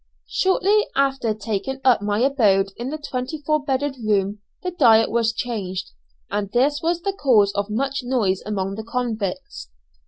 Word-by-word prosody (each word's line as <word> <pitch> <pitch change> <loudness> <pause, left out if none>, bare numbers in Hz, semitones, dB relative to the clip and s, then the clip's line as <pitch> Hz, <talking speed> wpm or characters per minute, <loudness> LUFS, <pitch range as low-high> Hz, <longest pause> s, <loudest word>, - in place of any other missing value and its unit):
Shortly 395 +3 +2
after 270 -4 +1
taking 220 +5 -3
up 255 -5 +4
my 205 +1 0
abode 210 -8 +3
in 240 +2 -5
the 310 - -4
twenty 285 0 -4
four 305 0 +1
bedded 275 0 -1
room, 205 -1 0 0.2
the 365 - -2
diet 230 -9 +5
was 230 -1 +2
changed, 205 -6 -4 0.4
and 205 -1 -2
this 280 +4 +2
was 340 +1 -1
the 395 - -1
cause 230 - +3
of 200 0 -2
much 270 +6 -1
noise 225 -7 0
among 195 -2 -2
the 220 +2 -6
convicts. 215 - -4
235 Hz, 160 wpm, -22 LUFS, 205-275 Hz, 0.4 s, diet